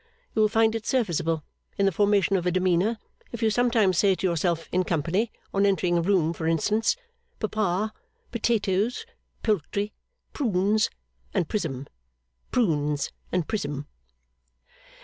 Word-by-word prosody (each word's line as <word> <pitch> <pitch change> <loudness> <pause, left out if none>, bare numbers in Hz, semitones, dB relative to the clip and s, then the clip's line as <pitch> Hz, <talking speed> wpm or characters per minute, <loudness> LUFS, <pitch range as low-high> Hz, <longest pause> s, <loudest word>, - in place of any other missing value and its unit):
You 220 - +2
will 215 - +5
find 225 0 +3
it 225 -1 -4
serviceable, 165 - 0 0.3
in 200 - +3
the 195 - +4
formation 200 0 +3
of 180 -1 0
a - - +3
demeanour, 185 +4 +2 0.3
if 235 -1 -5
you 220 - +4
sometimes 220 -6 +3
say 195 -2 +4
to 190 - -3
yourself 170 -1 0
in 185 +1 +2
company 175 +7 0 0.2
on 195 - +2
entering 190 -3 +2
a 170 - +3
room, 170 -3 +2
for 160 -1 -3
instance 210 - +2 0.4
Papa, 215 -1 0 0.4
potatoes, 220 -1 0 0.4
poultry, 205 +1 0 0.4
prunes 215 -4 +2 0.5
and 170 - +1
prism, 140 -10 -2 0.6
prunes 150 - +1 0.2
and 180 -3 0
prism. 145 -9 -3
195 Hz, 135 wpm, -26 LUFS, 170-215 Hz, 0.6 s, will